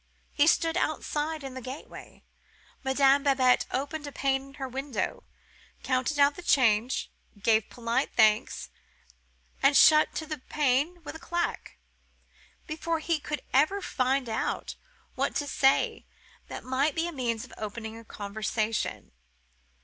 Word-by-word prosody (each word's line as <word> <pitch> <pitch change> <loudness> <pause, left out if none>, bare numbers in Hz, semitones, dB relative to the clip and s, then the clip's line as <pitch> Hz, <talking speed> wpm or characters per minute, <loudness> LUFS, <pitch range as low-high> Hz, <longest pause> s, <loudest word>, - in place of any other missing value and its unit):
He 290 0 +3
stood 330 +1 +3
outside 310 -2 -2
in 270 -1 -6
the 260 - -7
gateway: 260 +4 -10 0.6
Madame 270 +1 +4
Babette 265 -3 +3
opened 290 +3 -3
a - - -6
pane 270 0 -1
in 275 - -15
her 270 -2 -5
window, 265 -1 -4 0.6
counted 255 +2 0
out 285 0 +5
the - - -8
change, 245 -6 +2 0.3
gave 220 +1 +2
polite 235 -1 -1
thanks, 215 +1 +2 0.9
and 275 +1 +5
shut 305 +2 +6
to 315 - -3
the 305 -2 -5
pane 295 +5 0
with - - -7
a - - -8
clack, 345 +1 -3 0.9
before 325 +1 -2
he 320 0 -1
could 300 +1 -5
ever 310 +9 +3
find 260 -6 0
out 220 -1 -2 0.4
what - - -1
to 290 - 0
say 270 -1 +2 0.4
that - - -7
might 270 +4 0
be 330 - 0
the 345 - -3
means 235 -6 -2
of - - -16
opening 220 +1 -6
a 230 - -10
conversation. 215 +1 -3
270 Hz, 140 wpm, -28 LUFS, 245-305 Hz, 0.9 s, shut